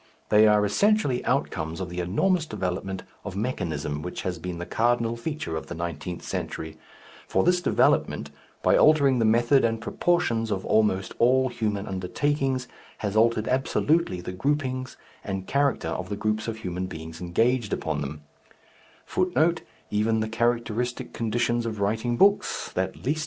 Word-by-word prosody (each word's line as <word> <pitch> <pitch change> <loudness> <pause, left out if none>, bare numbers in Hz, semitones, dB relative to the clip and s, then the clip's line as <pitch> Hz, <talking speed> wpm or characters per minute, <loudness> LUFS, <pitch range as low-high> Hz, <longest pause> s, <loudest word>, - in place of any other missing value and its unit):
They 105 +1 +6
are 105 -1 +4
essentially 200 - +2
outcomes 85 - -1
of 95 -2 -4
the 90 +1 -5
enormous 155 - +1
development 95 -1 -3 0.2
of 100 -2 -6
mechanism 80 - -2
which 90 +3 -5
has 90 -2 -3
been 90 +1 -5
the 85 - -5
cardinal 115 +1 +1
feature 115 - -4
of 80 - -5
the 85 - -6
nineteenth 85 +1 -5
century; 80 0 -4 0.5
for - - +2
this 180 +1 +3
development, - - +2 0.3
by - - +5
altering 140 -4 +5
the 115 - +3
method 120 +5 +4
and 115 -1 +1
proportions 120 -7 0
of 95 -2 -2
almost 105 -3 +2
all 130 +2 +4
human 105 -4 -2
undertakings, 130 +7 -1 0.4
has 100 0 -2
altered 110 0 +3
absolutely 135 - +1
the 90 - -5
grouping 130 +4 -1 0.4
and 95 -2 -4
character 140 +3 +1
of 90 0 -4
the 100 - -3
groups 110 +1 -1
of 115 -1 -3
human 90 -3 -4
beings 80 0 -8
engaged 115 +6 +1
upon 75 - -2
them. 75 +2 -5
110 Hz, 130 wpm, -26 LUFS, 90-130 Hz, 0.5 s, They